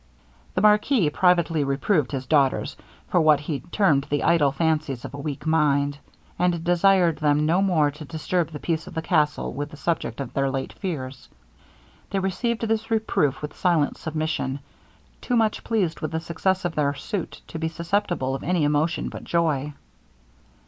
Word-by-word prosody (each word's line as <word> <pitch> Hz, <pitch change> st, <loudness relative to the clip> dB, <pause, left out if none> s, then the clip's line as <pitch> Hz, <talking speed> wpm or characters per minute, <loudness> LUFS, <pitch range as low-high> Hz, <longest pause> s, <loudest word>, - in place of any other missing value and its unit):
The -, -, +1 dB
marquis 210 Hz, -, +4 dB
privately 170 Hz, -3 st, +3 dB
reproved 140 Hz, +2 st, +1 dB
his 135 Hz, -2 st, -3 dB
daughters, 140 Hz, -1 st, +2 dB, 0.3 s
for 175 Hz, -, +3 dB
what 155 Hz, -2 st, +4 dB
he 145 Hz, -1 st, -3 dB
termed 150 Hz, -, +1 dB
the 145 Hz, 0 st, 0 dB
idle 160 Hz, -4 st, +4 dB
fancies 150 Hz, -3 st, -1 dB
of -, -, -8 dB
a 145 Hz, -, -7 dB
weak 145 Hz, 0 st, -5 dB
mind; 145 Hz, -3 st, +2 dB, 0.4 s
and 175 Hz, -2 st, +1 dB
desired 175 Hz, -1 st, +3 dB
them 150 Hz, 0 st, +2 dB
no 170 Hz, +5 st, +3 dB
more 160 Hz, -7 st, +2 dB
to 150 Hz, +2 st, -10 dB
disturb 165 Hz, +2 st, -1 dB
the 155 Hz, -, -7 dB
peace 165 Hz, +1 st, -2 dB
of -, -, -10 dB
the 160 Hz, -, -2 dB
castle 150 Hz, -2 st, +1 dB
with 145 Hz, +1 st, -4 dB
the 150 Hz, -, -12 dB
subject 165 Hz, -8 st, -2 dB
of 135 Hz, -3 st, -5 dB
their 135 Hz, 0 st, +1 dB
late 135 Hz, 0 st, -3 dB
fears. 135 Hz, -8 st, -6 dB, 0.8 s
They 200 Hz, -, -2 dB
received 205 Hz, +5 st, -1 dB
this 225 Hz, 0 st, -1 dB
reproof 215 Hz, -, 0 dB
with 150 Hz, -, -5 dB
silent 170 Hz, -5 st, +1 dB
submission 155 Hz, -4 st, -2 dB, 0.6 s
too 245 Hz, -, -1 dB
much 220 Hz, -2 st, +1 dB
pleased 190 Hz, -8 st, 0 dB
with 155 Hz, -, -3 dB
the 160 Hz, -, 0 dB
success 180 Hz, +3 st, -1 dB
of 175 Hz, -, -1 dB
their 145 Hz, -2 st, 0 dB
suit 185 Hz, +6 st, -5 dB
to 165 Hz, -, -6 dB
be 160 Hz, -, -1 dB
susceptible 170 Hz, -4 st, -1 dB
of 135 Hz, -, -4 dB
any 180 Hz, -3 st, 0 dB
emotion 150 Hz, +3 st, +1 dB
but -, -, -8 dB
joy. 150 Hz, -4 st, 0 dB
160 Hz, 175 wpm, -24 LUFS, 145-180 Hz, 0.8 s, marquis